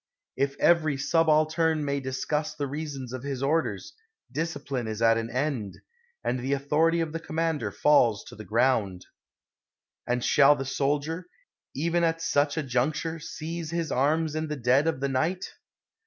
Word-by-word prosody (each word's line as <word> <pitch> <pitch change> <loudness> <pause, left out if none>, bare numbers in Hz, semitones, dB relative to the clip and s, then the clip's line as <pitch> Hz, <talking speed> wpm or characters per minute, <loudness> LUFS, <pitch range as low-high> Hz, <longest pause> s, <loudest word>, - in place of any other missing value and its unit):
If 140 0 -1
every 155 -4 +3
subaltern 155 +1 +2
may 140 0 0
discuss 150 +3 -2
the 145 -1 -2
rea 150 +3 -4
sons 130 -4 -7
of 130 - -5
his 135 -1 -4
orders, 165 - -1 0.4
discipline 140 -6 -3
is 110 -1 -4
at 115 0 +5
an 115 0 -4
end, 125 -6 -2 0.5
and 125 - -1
the 130 +3 -1
authority 155 +4 +2
of 160 -2 -2
the 165 - -3
commander 160 -7 -1
falls 120 -5 +3
to - - -12
the 110 - -9
ground. 105 -5 +1 1.0
And 125 0 0
shall 145 0 +6
the 135 -1 -4
soldier, 145 +6 -1 0.5
even 170 +4 +1
at 165 0 +1
such 145 -1 +1
a 155 - 0
juncture, 150 +6 -1
seize 165 +1 -6
his 165 -2 -2
arms 155 +4 +1
in 155 0 -2
the 150 - -3
dead 130 +3 +2
of 150 -5 -1
the 140 - +1
night 155 +8 0
145 Hz, 165 wpm, -27 LUFS, 130-160 Hz, 1.0 s, shall